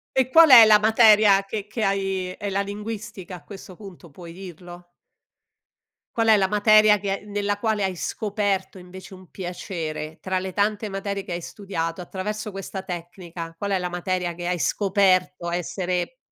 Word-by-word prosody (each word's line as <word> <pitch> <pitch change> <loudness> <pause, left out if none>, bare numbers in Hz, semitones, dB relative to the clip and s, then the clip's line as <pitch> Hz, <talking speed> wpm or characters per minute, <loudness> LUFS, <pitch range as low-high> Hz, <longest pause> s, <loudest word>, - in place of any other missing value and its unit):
E 260 -1 +2
qual 325 +3 +7
è 235 -4 +11
la 215 -1 +7
materia 215 -2 +5
che 210 0 -5
che 215 +2 -5
hai 195 -1 -1
è 200 +2 -5
la 195 +1 0
linguistica, 205 -2 -6
a - - -15
questo 195 -2 -11
punto 180 -5 -13
puoi 170 +3 -12
dirlo? 175 -1 -11 1.3
Qual 225 -1 +1
è 220 - +7
la 190 -1 +2
materia 210 +1 +5
che 195 0 -4
nella 205 0 -2
quale 215 -2 -1
hai 185 -2 -2
scoperto 200 -1 -2
invece 185 +1 -12
un 185 -1 -16
piacere, 165 -4 -6
tra 185 0 -2
le 190 0 -5
tante 210 +2 -1
materie 195 0 -4
che - - -7
hai 175 - -3
studiato 175 -3 -5
attraverso 210 +4 -5
questa 195 0 -7
tecnica, 175 -2 -8
qual 200 +4 -4
è 195 - +1
la 180 0 -3
materia 180 0 -3
che 175 0 -7
hai 180 -1 -1
scoperto 185 -2 +1
essere 180 +4 -3
195 Hz, 170 wpm, -23 LUFS, 180-210 Hz, 1.3 s, è